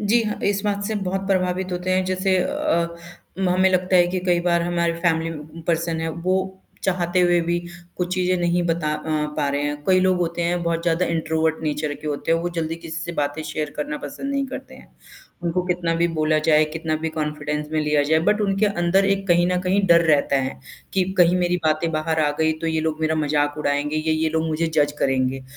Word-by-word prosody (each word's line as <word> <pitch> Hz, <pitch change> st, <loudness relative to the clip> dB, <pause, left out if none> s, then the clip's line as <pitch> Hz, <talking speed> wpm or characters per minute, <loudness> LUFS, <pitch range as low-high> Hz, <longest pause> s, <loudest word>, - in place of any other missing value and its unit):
जी 215 Hz, +3 st, +3 dB
हाँ, 210 Hz, -1 st, -3 dB
इस 200 Hz, -1 st, +1 dB
बात 200 Hz, -1 st, -1 dB
से 220 Hz, +2 st, -2 dB
बहुत 195 Hz, +1 st, -2 dB
प्रभावित 185 Hz, -1 st, 0 dB
होते 180 Hz, +1 st, -2 dB
हैं, 185 Hz, 0 st, +2 dB
जैसे 185 Hz, +1 st, +1 dB
अ 170 Hz, 0 st, 0 dB, 0.5 s
उम, 190 Hz, -1 st, +1 dB
हमें 185 Hz, +1 st, +3 dB
लगता 185 Hz, 0 st, +2 dB
है 175 Hz, -1 st, +6 dB
कि 185 Hz, +1 st, -2 dB
कई 175 Hz, -1 st, +3 dB
बार 170 Hz, -1 st, +2 dB
हमारे 170 Hz, -1 st, 0 dB
फैमिली 165 Hz, -1 st, +1 dB, 0.4 s
पर्सन 165 Hz, -1 st, 0 dB
है, 165 Hz, -, -2 dB
वो 185 Hz, +3 st, -2 dB, 0.2 s
चाहते 180 Hz, -1 st, +1 dB
हुए 175 Hz, -1 st, +4 dB
भी 170 Hz, +1 st, 0 dB, 0.4 s
कुछ 180 Hz, 0 st, -1 dB
चीज़ें 185 Hz, 0 st, +1 dB
नहीं 175 Hz, 0 st, +1 dB
बता 165 Hz, -2 st, 0 dB
अ, 150 Hz, -, -5 dB, 0.4 s
पा 145 Hz, -2 st, 0 dB
रहे 140 Hz, +1 st, -1 dB
हैं, 145 Hz, 0 st, -3 dB
कई 185 Hz, -1 st, +4 dB
लोग 185 Hz, -1 st, +2 dB
होते 170 Hz, 0 st, -1 dB
हैं 175 Hz, +1 st, 0 dB
बहुत 170 Hz, -1 st, -1 dB
ज़्यादा 170 Hz, +1 st, +1 dB
इंट्रोवर्ट 160 Hz, -1 st, 0 dB
नेचर 150 Hz, -1 st, -2 dB
के 155 Hz, -, -10 dB
होते 150 Hz, +2 st, -1 dB
हैं, 165 Hz, -, +3 dB
वो 175 Hz, -, -1 dB
जल्दी 165 Hz, 0 st, -1 dB
किसी 160 Hz, -1 st, -6 dB
से 170 Hz, -, -5 dB
बातें 145 Hz, 0 st, -2 dB
शेयर 155 Hz, -1 st, -4 dB
करना 150 Hz, 0 st, -3 dB
पसंद 210 Hz, -, -6 dB
नहीं 275 Hz, 0 st, 0 dB
करते 265 Hz, -, -8 dB
हैं। -, -, -17 dB, 0.5 s
उनको 175 Hz, +1 st, 0 dB
कितना 175 Hz, -2 st, 0 dB
भी 170 Hz, +1 st, +2 dB
बोला 155 Hz, -1 st, +1 dB
जाए, 155 Hz, 0 st, +4 dB
कितना 160 Hz, -1 st, -2 dB
भी 160 Hz, +1 st, -3 dB
कॉन्फिडेंस 150 Hz, -1 st, -3 dB
में 155 Hz, -, +1 dB
लिया 150 Hz, -1 st, +2 dB
जाए 155 Hz, +2 st, +3 dB
बट 210 Hz, +1 st, +2 dB
उनके 200 Hz, 0 st, +2 dB
अंदर 190 Hz, 0 st, +2 dB
एक 195 Hz, 0 st, 0 dB
कहीं 175 Hz, 0 st, +4 dB
न 180 Hz, 0 st, +1 dB
कहीं 185 Hz, +2 st, +1 dB
डर 170 Hz, -1 st, +6 dB
रहता 145 Hz, -2 st, +3 dB
है, 130 Hz, 0 st, -4 dB, 0.3 s
कि 190 Hz, -, +2 dB, 0.2 s
कहीं 175 Hz, 0 st, +5 dB
मेरी 180 Hz, 0 st, +1 dB
बातें 155 Hz, +1 st, +1 dB
बाहर 160 Hz, +1 st, 0 dB
आ 145 Hz, -, +2 dB
गई 160 Hz, 0 st, +3 dB
तो -, -, -1 dB
ये 160 Hz, -1 st, 0 dB
लोग 160 Hz, 0 st, -2 dB
मेरा 160 Hz, 0 st, +1 dB
मज़ाक 145 Hz, -1 st, 0 dB
उड़ाएँगे, 145 Hz, +1 st, 0 dB
ये 155 Hz, +1 st, 0 dB
ये 160 Hz, 0 st, +1 dB
लोग 160 Hz, 0 st, 0 dB
मुझे 160 Hz, +1 st, 0 dB
जज 145 Hz, -2 st, +3 dB
करेंगे। 130 Hz, 0 st, 0 dB
170 Hz, 225 wpm, -22 LUFS, 155-180 Hz, 0.5 s, है